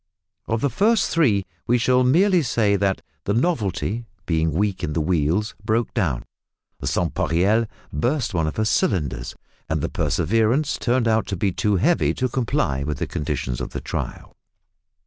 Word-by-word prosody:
Of 115 0 -1
the 140 - +1
first 210 - +2
three 110 - +3 0.2
we 120 - +4
shall 125 +2 +3
merely 180 +8 +4
say 115 -7 +2
that 100 -1 0 0.2
the 100 - 0
"Novelty," 115 - -1 0.2
being 80 -2 +1
weak 95 +3 -1
in 75 - -1
the 80 - 0
wheels, 85 +5 +1
broke 110 +2 0
down; 85 - 0 0.6
the - - -4
"Sans - - 0
pareil" 100 +7 +2 0.3
burst 120 - 0
one 80 -3 +1
of 80 - -3
her 110 - 0
cylinders; 70 - 0 0.3
and - - 0
the - - -1
"Perseverance" 110 - +1
turned 120 -1 +1
out 110 -2 +2
to 100 - -3
be 95 +2 +1
too 105 +3 +1
heavy 165 - +2
to 130 - 0
comply 120 - 0
with 75 0 -3
the - - -2
conditions 65 -4 -3
of - - -5
the - - -3
trial. - - -5
105 Hz, 170 wpm, -23 LUFS, 85-125 Hz, 0.6 s, we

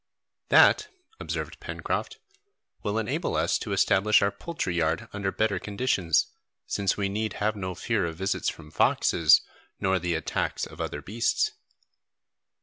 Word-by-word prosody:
"That," 425 - +6 0.3
observed - - -5
Pencroft, - - -4 0.6
"will 105 0 -2
enable 110 -2 -1
us - - +1
to - - -5
establish 105 +2 +4
our 100 - +2
poultry 100 - -4
yard 80 -1 0
under 100 -1 -2
better 105 -3 0
conditions, 100 - +1 0.4
since 100 -2 0
we 100 -1 0
need 105 +1 -2
have 105 +1 -1
no 95 -3 -4
fear 105 -4 0
of 80 - -5
visits 95 +4 -1
from 75 0 -10
foxes 80 0 +4 0.4
nor 95 0 +1
the 85 -1 -1
attacks 80 - -2
of - - -9
other - - -4
beasts." 115 - 0
100 Hz, 145 wpm, -27 LUFS, 90-110 Hz, 0.6 s, That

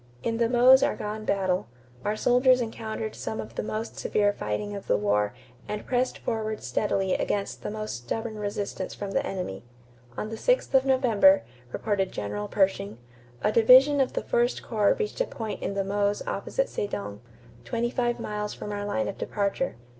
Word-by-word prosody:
In 225 0 0
the 230 -1 +2
Meuse 255 +2 +7
Argonne 215 +1 -2
battle, 190 - 0 0.4
our 210 - 0
soldiers 250 +3 +4
encountered 220 -2 -4
some 110 0 -5
of 110 +1 -6
the - - -2
most 215 +1 -4
severe 205 -1 +2
fighting 155 - -3
of 200 - -8
the - - +3
war 105 +1 +1 0.3
and 210 0 -4
pressed 255 0 0
forward 220 -1 -3
steadily 195 -3 0
against 200 -1 -1
the - - -4
most 215 - -4
stubborn 215 - -4
resistance 200 -2 -4
from 200 -1 -5
the 275 - +1
enemy. 180 - -4 0.5
On 215 - -3
the 225 - -5
6th - - +1
of 265 0 +5
November, 230 - +5 0.3
reported 195 - -1
General 105 0 -4
Pershing, 190 - 0 0.5
"a 210 - +3
division 260 +6 +7
of 260 - 0
the - - -2
first 240 +1 +1
corps 210 -3 +2
reached 435 +3 -2
a - - +3
point 220 -3 -5
on 200 - -2
the 195 - +1
Meuse 205 +1 0
opposite - - -1
Sedan, 100 - -4 0.4
twenty 235 0 -1
five 240 -1 0
miles 210 0 -3
from 210 - -6
our 205 0 -3
line 110 - -1
of - - -5
departure. 205 +6 -1
210 Hz, 175 wpm, -27 LUFS, 195-240 Hz, 0.5 s, Meuse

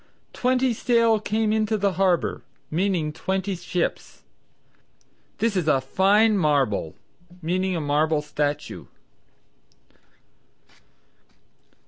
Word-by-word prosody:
"Twenty 255 0 +1
sail 230 -1 +2
came 215 0 0
into 220 0 +1
the 200 -1 +1
harbor," 185 -3 +1 0.3
meaning 170 -3 0
twenty 190 +4 -2
ships. 175 0 -4 1.1
"This 225 -2 0
is 175 -4 0
a 145 -3 +4
fine 200 +9 +3
marble," 135 - +1 0.4
meaning 185 +2 -1
a 165 - -2
marble 150 +1 +1
statue. 145 0 -3
185 Hz, 90 wpm, -24 LUFS, 155-215 Hz, 1.1 s, a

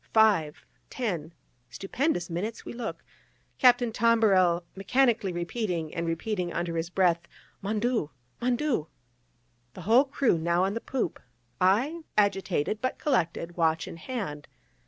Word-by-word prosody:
Five, 200 -9 +3 0.2
ten, 185 - -3 0.4
stupendous 195 - -1
minutes 190 +7 -4
we - - -6
look, 235 -2 -5 0.6
Captain 245 -2 +5
Tombarel 200 -7 +3
mechanically 225 0 +2
repeating 175 -2 -3
and 170 -1 -2
repeating 175 +2 -2
under 170 0 -2
his 165 +1 -2
breath 175 -2 +2 0.3
"Mon 210 +2 -1
Dieu!" 235 -9 0 0.3
"Mon 245 0 +2
Dieu!" 245 - -1 0.9
the - - -8
whole 230 - +5
crew 270 - +1
now 170 +2 +2
on 195 +1 0
the 230 - -3
poop, 250 -11 -2 0.4
I 250 - +2 0.2
agitated, 200 -2 +1
but 255 - -1
collected, 175 - -1
watch 160 -1 +1
in - - -8
hand. 165 - -5
195 Hz, 135 wpm, -28 LUFS, 170-235 Hz, 0.9 s, Captain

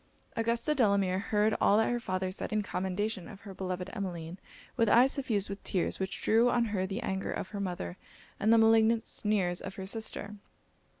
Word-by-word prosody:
Augusta 230 +6 +1
Delamere 200 -7 +2
heard 210 +1 +1
all 205 - +5
that 225 - +2
her 240 - 0
father 185 -4 -2
said 185 - -5
in 215 -1 0
commendation 190 0 -3
of 195 - -11
her 200 -1 -9
beloved 185 -1 -4
Emmeline, 180 -4 -5 0.4
with 230 -2 +2
eyes 250 +5 +6
suffused 220 -8 -1
with 200 +1 -7
tears, 185 - -1
which 190 0 -4
drew 230 +3 +4
on 240 -1 +2
her 190 -2 0
the 200 +5 -4
anger 190 -2 -2
of - - -4
her 205 - -6
mother 175 - -4 0.4
and 215 - +3
the 230 - +7
malignant 225 0 +4
sneers 190 -5 0
of 195 0 -7
her 190 - -6
sister. 210 0 -2
200 Hz, 190 wpm, -30 LUFS, 190-225 Hz, 0.4 s, the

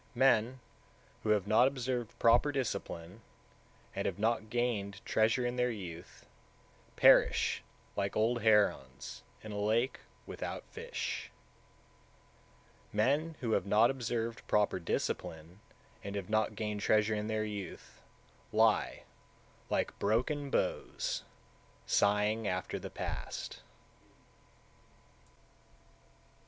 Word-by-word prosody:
155. 120 -2 +4
Men - - -18 0.6
who 110 - -3
have 105 -3 +3
not 110 +5 +5
observed 125 -3 -3
proper 120 +5 +5
discipline, 100 -7 -4 0.7
and - - -1
have - - -2
not 110 0 0
gained 110 -5 -1
treasure 110 +3 +2
in 120 +1 -2
their 125 0 +2
youth, 90 -7 -8 0.7
perish - - +5 0.3
like 100 -1 -1
old 115 +2 +2
herons 105 - +2 0.2
in 110 - -7
a 105 - -4
lake 115 +5 +1 0.3
without - - -5
fish. - - -4 1.6
156. - - -29
Men 145 +10 +1
who 115 -3 -1
have 100 - +1
not 110 +5 +5
observed 115 -3 -3
proper 105 -3 +2
discipline, 85 +1 -3 0.4
and 100 0 -5
have 100 0 -4
not 110 0 +1
gained 105 -1 -3
treasure 110 +1 +3
in 105 0 -2
their 110 -1 -1
youth, 100 -4 -7 0.5
lie, - - +2 0.7
like - - -1
broken 130 +7 0
bows, - - -1 0.6
sighing 105 +2 +2
after 90 0 -2
the - - -7
past. - - -5
110 Hz, 110 wpm, -33 LUFS, 100-120 Hz, 1.6 s, not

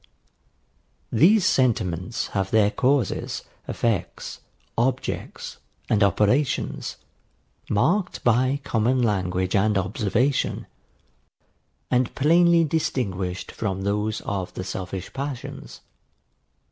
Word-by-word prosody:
These 185 - +5
sentiments 105 - +1
have 95 -1 -1
their 105 -1 +4
causes, 130 -4 0 0.2
effects, 115 -7 -2 0.4
objects, 130 +2 -2 0.3
and 110 - +2
operations, 105 - +1 0.7
marked 180 - +1
by 130 +4 +2
common 125 0 +1
language 95 -3 0
and 105 +1 +3
observation, 105 +7 0 1.3
and 125 -1 +1
plainly 170 +3 +5
distinguished 120 - -2
from 95 -3 -3
those 105 +2 -1
of 95 -3 -3
the 95 - -4
selfish 95 0 -5
passions. 135 -2 -6
110 Hz, 85 wpm, -24 LUFS, 95-135 Hz, 1.3 s, These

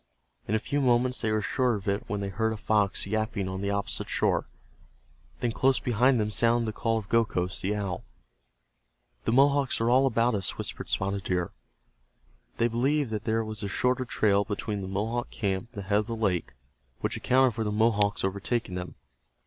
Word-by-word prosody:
In 110 - +1
a - - +4
few 140 +6 -1
moments 125 0 +2
they 110 - 0
were 110 -1 +1
sure 125 +2 +1
of 100 0 -7
it 100 +1 0
when 105 -2 -2
they 100 - -2
heard 110 +3 0
a - - -5
fox 105 -2 +1
yapping 110 -1 -1
on 95 0 -4
the 100 - -1
opposite 100 0 -2
shore. - - +1 0.9
Then 120 - +1
close 130 +3 +2
behind 125 +1 +3
them 105 0 0
sounded 115 +2 +3
the 110 - -2
call 115 0 0
of 105 -3 -5
Gokhos, 100 -5 +1
the 100 +3 0
owl. 100 -4 -3 1.2
"The - - +1
Mohawks 140 +1 +3
are 115 +1 +2
all 130 +1 +4
around 115 +2 +2
us," 100 -3 -2
whispered - - -5
Spotted 100 0 -1
Deer. 90 -2 -1 1.1
They 115 - +3
believed 130 +3 0
that 105 -2 -3
there 110 0 +1
was 110 -1 -5
a 100 - -2
shorter 125 +5 +1
trail 100 -3 +2
between 105 -1 -3
the 95 - -5
Mohawk 110 +5 -2
camp 100 +1 -2
and 100 -5 -6
the - - -14
head 100 +1 +3
of 105 - -3
the 115 - -3
lake, 100 -7 -1 0.5
which - - -1
accounted 130 -1 +3
for 110 - -2
the 105 - -1
Mohawks 105 -1 +2
overtaking 100 +2 -1
them. 90 0 -5
110 Hz, 195 wpm, -28 LUFS, 100-120 Hz, 1.2 s, a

